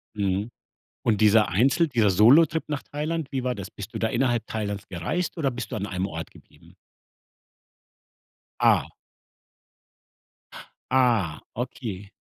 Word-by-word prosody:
Mhm. 100 Hz, +1 st, -1 dB, 0.6 s
Und 110 Hz, -2 st, +2 dB
dieser 110 Hz, 0 st, +5 dB
Einzel 135 Hz, -, +3 dB
dieser 115 Hz, -7 st, +2 dB
Solotrip 145 Hz, -, +5 dB
nach 145 Hz, -3 st, -3 dB
Thailand, 150 Hz, 0 st, -4 dB
wie 130 Hz, -2 st, -2 dB
war 125 Hz, -1 st, -1 dB
das? 100 Hz, -2 st, -8 dB
Bist 100 Hz, +2 st, -9 dB
du -, -, -4 dB
da 110 Hz, -, +1 dB
innerhalb 120 Hz, -2 st, 0 dB
Thailands 105 Hz, -2 st, -4 dB
gereist 100 Hz, -, -3 dB
oder 140 Hz, -4 st, 0 dB
bist 125 Hz, +2 st, -6 dB
du -, -, -3 dB
an 100 Hz, -, -3 dB
einem 95 Hz, 0 st, -2 dB
Ort 80 Hz, -3 st, -7 dB
geblieben? -, -, -20 dB, 1.9 s
Ah. -, -, +4 dB, 2.1 s
Ah, 115 Hz, -11 st, +2 dB, 0.2 s
okay. 105 Hz, -5 st, -5 dB
115 Hz, 130 wpm, -25 LUFS, 100-135 Hz, 2.1 s, dieser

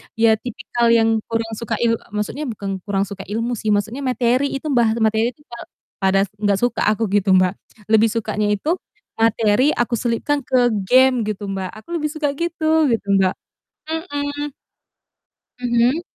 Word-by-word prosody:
ya 225 Hz, -1 st, +4 dB
tipikal 240 Hz, 0 st, -3 dB
yang 225 Hz, -1 st, +3 dB
kurang 225 Hz, 0 st, -2 dB
suka 230 Hz, -1 st, -4 dB
il 230 Hz, -1 st, +2 dB, 0.2 s
maksudnya 270 Hz, +8 st, -3 dB
bukan 200 Hz, -4 st, -4 dB
kurang 200 Hz, -1 st, 0 dB
suka 195 Hz, -1 st, -8 dB
ilmu 230 Hz, +3 st, -2 dB
sih, 215 Hz, -, -6 dB
maksudnya 220 Hz, +6 st, -1 dB
materi 255 Hz, +2 st, +1 dB
itu, 285 Hz, +3 st, -4 dB
bahas 235 Hz, -3 st, +3 dB
materi 220 Hz, +2 st, +2 dB
itu 295 Hz, -, -27 dB
kal 235 Hz, -, -8 dB, 0.4 s
pada 195 Hz, 0 st, +3 dB, 0.2 s
nggak 205 Hz, -2 st, +1 dB
suka 245 Hz, 0 st, +1 dB
aku 220 Hz, -2 st, -2 dB
gitu, 200 Hz, -1 st, +3 dB
Mbak. 185 Hz, 0 st, +3 dB, 0.4 s
Lebih 220 Hz, +1 st, +5 dB
sukanya 210 Hz, 0 st, -1 dB
itu 315 Hz, -, -1 dB, 0.4 s
materi 225 Hz, +4 st, +3 dB
aku 240 Hz, 0 st, 0 dB
selipkan 245 Hz, +6 st, 0 dB
ke 250 Hz, -2 st, +3 dB, 0.2 s
game 255 Hz, 0 st, +4 dB
gitu 205 Hz, -1 st, -4 dB
Mbak, 190 Hz, -1 st, -3 dB
aku 215 Hz, -, -13 dB
lebih 305 Hz, -, -3 dB
suka 300 Hz, -2 st, -1 dB
gitu, 320 Hz, -2 st, +1 dB
gitu 225 Hz, -4 st, -1 dB
Mbak. 190 Hz, -1 st, +2 dB, 0.5 s
Mhm. 290 Hz, -3 st, -3 dB, 1.1 s
Mhm. 245 Hz, +4 st, +2 dB
230 Hz, 160 wpm, -20 LUFS, 210-260 Hz, 1.1 s, Lebih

